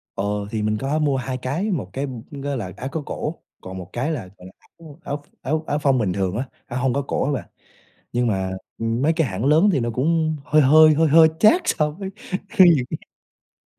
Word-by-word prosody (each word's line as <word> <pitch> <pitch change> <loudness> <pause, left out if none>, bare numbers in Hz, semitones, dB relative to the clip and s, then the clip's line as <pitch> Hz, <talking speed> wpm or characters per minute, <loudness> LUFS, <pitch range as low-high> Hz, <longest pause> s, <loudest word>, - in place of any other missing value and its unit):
Ờ, 95 - -2 0.3
thì 110 -1 -2
mình 105 0 0
có 140 +5 -1
mua 145 -3 +1
2 130 0 -3
cái, 155 +12 -2
1 125 - -3
cái, 135 +5 -3 0.3
ừm, 140 -2 -8
á 140 -1 -2
là 95 -6 -5
áo 130 - -5
có 160 - -3
cổ 155 - -4 0.3
còn 95 0 -8
1 90 0 -9
cái 130 +6 -2
là, 115 -11 -4
gọi 90 - -13
là, - - -11 0.3
áo 160 -3 -12
áo 145 0 -5 0.2
áo 155 +4 -1
áo 145 - 0
phông 135 -3 +2
bình 100 -6 0
thường 95 -1 -1
á, 125 - -1 0.2
áo 120 +1 -4
hông 130 -2 +1
có 140 - 0
cổ 140 - -2
á 145 - 0
bạn. 135 - -4 0.6
Nhưng 120 0 +1
mà, 95 -3 -1 0.3
ừm, 115 +2 -1
mấy 160 +3 +3
cái 160 -3 +1
hãng 100 +4 -4
lớn 160 +8 +5
thì 140 - +1
nó 120 0 -1
cũng 155 +4 +1
hơi 155 0 +4
hơi, 155 +3 +7
hơi 160 +1 +3
hơi 160 +2 +7
chát 275 - +5
so 150 0 +1
với 190 +5 -7 0.4
khi 205 -4 +6
những 125 - -1 0.8
cái - - -78
140 Hz, 240 wpm, -22 LUFS, 120-155 Hz, 0.8 s, hơi